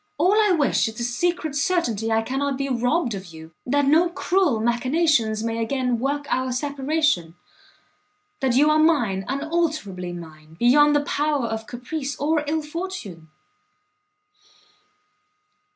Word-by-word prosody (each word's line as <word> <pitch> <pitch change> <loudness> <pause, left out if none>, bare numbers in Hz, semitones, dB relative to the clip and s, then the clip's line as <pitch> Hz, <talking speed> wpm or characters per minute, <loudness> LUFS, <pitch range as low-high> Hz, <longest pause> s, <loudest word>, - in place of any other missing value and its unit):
All 370 - +3
I 425 -1 +4
wish 290 -8 +2
is 220 - -6
the 235 - -4
secret 315 +6 -1
certainty 280 - 0
I 225 0 +2
cannot 270 +3 -2
be 275 0 -2
robbed 250 +1 0
of 195 -1 -7
you, 160 -1 -12 0.2
that 285 +2 +2
no 320 +5 +4
cruel 350 - +1
machinations 240 -1 +1
may 230 0 -2
again 250 0 -1
work 285 +3 -2
our 255 -1 -1
separation, 280 - -1 1.0
that 260 -3 +1
you 295 +3 +5
are 305 - +3
mine, 240 -12 +2
unalterably 280 - -2
mine, 160 -2 -11
beyond 295 +7 +5
the 290 - +3
power 290 -4 0
of 225 -1 -4
caprice 270 +3 -5
or 300 +2 +1
ill 315 +1 -1
fortune." 300 - -7
270 Hz, 135 wpm, -23 LUFS, 225-310 Hz, 1.0 s, you